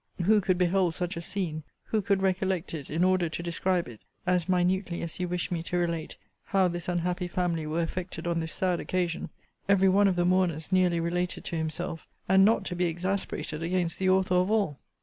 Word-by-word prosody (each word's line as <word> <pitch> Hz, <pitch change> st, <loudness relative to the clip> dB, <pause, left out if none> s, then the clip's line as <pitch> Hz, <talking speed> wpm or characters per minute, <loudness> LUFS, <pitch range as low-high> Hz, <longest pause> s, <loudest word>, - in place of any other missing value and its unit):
Who 210 Hz, +3 st, +5 dB
could 185 Hz, -1 st, +1 dB
behold 180 Hz, -1 st, +2 dB
such 180 Hz, -1 st, -2 dB
a 170 Hz, -, -4 dB
scene, 170 Hz, -4 st, -3 dB, 0.2 s
who 220 Hz, -, 0 dB
could 195 Hz, -1 st, +1 dB
recollect 190 Hz, -2 st, 0 dB
it 145 Hz, -4 st, -6 dB
in 165 Hz, +3 st, +1 dB
order 185 Hz, -2 st, +3 dB
to 170 Hz, -, -5 dB
describe 175 Hz, +1 st, 0 dB
it, 115 Hz, -3 st, -11 dB, 0.2 s
(as 180 Hz, -1 st, +1 dB
minutely 180 Hz, 0 st, +1 dB
as 165 Hz, +1 st, -5 dB
you 180 Hz, -, -1 dB
wished 180 Hz, +1 st, -2 dB
me 170 Hz, -2 st, -1 dB
to 175 Hz, +2 st, -2 dB
relate 170 Hz, -2 st, -2 dB, 0.3 s
how 190 Hz, -2 st, +3 dB
this 175 Hz, -1 st, -4 dB
unhappy 180 Hz, +1 st, -1 dB
family 170 Hz, -3 st, -1 dB
were 165 Hz, +2 st, 0 dB
affected 180 Hz, +2 st, -5 dB
on 170 Hz, -1 st, 0 dB
this 160 Hz, -1 st, -3 dB
sad 180 Hz, -2 st, 0 dB
occasion,) 180 Hz, -2 st, -2 dB, 0.4 s
every 195 Hz, -1 st, +5 dB
one 200 Hz, +2 st, +5 dB
of 190 Hz, -, +2 dB
the 175 Hz, 0 st, +1 dB
mourners 180 Hz, -3 st, +1 dB
nearly 180 Hz, -2 st, +3 dB
related 175 Hz, +1 st, -2 dB
to -, -, -3 dB
himself, 160 Hz, +1 st, -3 dB, 0.2 s
and 190 Hz, +1 st, +6 dB
not 220 Hz, +3 st, +3 dB
to 180 Hz, -, -3 dB
be 180 Hz, 0 st, +1 dB
exasperated 175 Hz, -2 st, -2 dB
against 170 Hz, 0 st, -1 dB
the 190 Hz, 0 st, +2 dB
author 190 Hz, -1 st, +3 dB
of 180 Hz, +1 st, +3 dB
all? 200 Hz, -10 st, +1 dB
180 Hz, 210 wpm, -28 LUFS, 170-185 Hz, 0.4 s, and